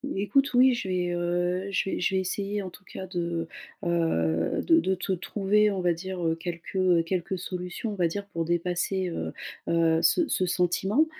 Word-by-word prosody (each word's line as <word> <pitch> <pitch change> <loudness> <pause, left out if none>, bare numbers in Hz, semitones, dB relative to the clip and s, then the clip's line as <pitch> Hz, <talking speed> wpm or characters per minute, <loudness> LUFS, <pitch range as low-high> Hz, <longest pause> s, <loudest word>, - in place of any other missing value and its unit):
Écoute, 260 +8 +2
oui, 255 +1 +6
je 240 -5 -3
vais, 180 -1 0
heu, 175 +2 0
je 195 0 0
vais - - -2
je 190 - +1
vais 190 - +2
essayer 200 +2 -2
en 190 - -5
tout 195 +3 -16
cas, 190 - -7
de, 170 -2 -2 0.4
heu, 85 - +1
de 330 -1 +6
de 190 -10 +1
te 185 +1 -4
trouver, 205 +3 +2
on 190 -2 -2
va 175 - +3
dire, 180 +1 -4
heu, 165 0 +2
quelques, 170 +2 -7
heu, 180 -3 +4
quelques 185 +2 -2
solutions, 180 +4 -4
on - - -4
va 180 -3 +2
dire, 200 +5 -4
pour 165 -4 -3
dépasser, 175 +2 0
heu, 165 - -4 0.3
heu, 165 -1 +3
ce 345 - +4
ce 185 - +1
sentiment. 185 - +2
180 Hz, 200 wpm, -27 LUFS, 170-195 Hz, 0.4 s, oui